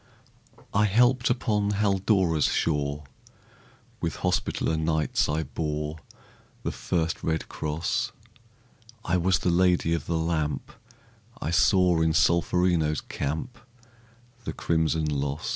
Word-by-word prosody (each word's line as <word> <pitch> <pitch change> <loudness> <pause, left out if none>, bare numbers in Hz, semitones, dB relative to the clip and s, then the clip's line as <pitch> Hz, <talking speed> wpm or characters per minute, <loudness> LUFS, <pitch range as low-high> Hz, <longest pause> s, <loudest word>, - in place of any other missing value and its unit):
I 105 +1 +4
helped 125 +4 +3
upon 105 -4 0
Haldora's 95 -5 +2
shore; 75 -1 0 1.0
With - - -2
Hospitaller 80 - 0
Knights 80 -1 0
I 75 +2 0
bore 75 +1 -3 0.7
The - - -1
first 80 -2 -2
red 80 -1 -1
cross; 75 +2 -2 0.9
I 90 +1 +2
was 90 0 +2
the 90 - 0
Lady 90 -1 +3
of 85 - -3
the 85 - 0
Lamp; 80 -2 -2 0.7
I 80 - -3
saw 90 -1 +4
in 80 -1 +2
Solferino's 85 -1 +2
camp 80 - -4 0.8
The - - -4
crimson 80 -1 0
loss. 70 0 -2
80 Hz, 110 wpm, -26 LUFS, 80-95 Hz, 1.0 s, I